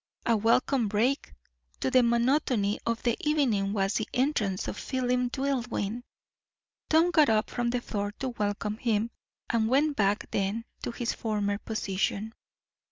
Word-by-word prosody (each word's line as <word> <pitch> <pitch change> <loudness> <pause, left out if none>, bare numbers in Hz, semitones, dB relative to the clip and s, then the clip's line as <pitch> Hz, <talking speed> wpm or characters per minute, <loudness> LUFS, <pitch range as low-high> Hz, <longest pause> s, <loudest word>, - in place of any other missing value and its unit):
A 230 - +3
welcome 230 +3 +2
break 230 +7 0 0.4
to 260 - -1
the 255 - +6
monotony 235 -3 +2
of 230 -1 -1
the 235 -2 +2
evening 250 -10 +1
was 195 -1 0
the 220 - -1
entrance 240 -8 0
of - - -3
Philip 250 0 -1
Dillwyn. 245 -5 -2 0.9
Tom 325 +3 +4
got 310 -6 +5
up 215 -1 +1
from 240 0 -1
the 245 0 -1
floor 205 -3 -3
to 265 +4 -4
welcome 210 -2 -2
him, 225 -1 0 0.4
and 225 -2 +2
went 285 +3 +3
back 205 -2 0
then 205 +4 -1 0.2
to - - -3
his 235 0 -2
former 205 -2 -1
position. 210 0 -2
230 Hz, 150 wpm, -28 LUFS, 210-255 Hz, 0.9 s, the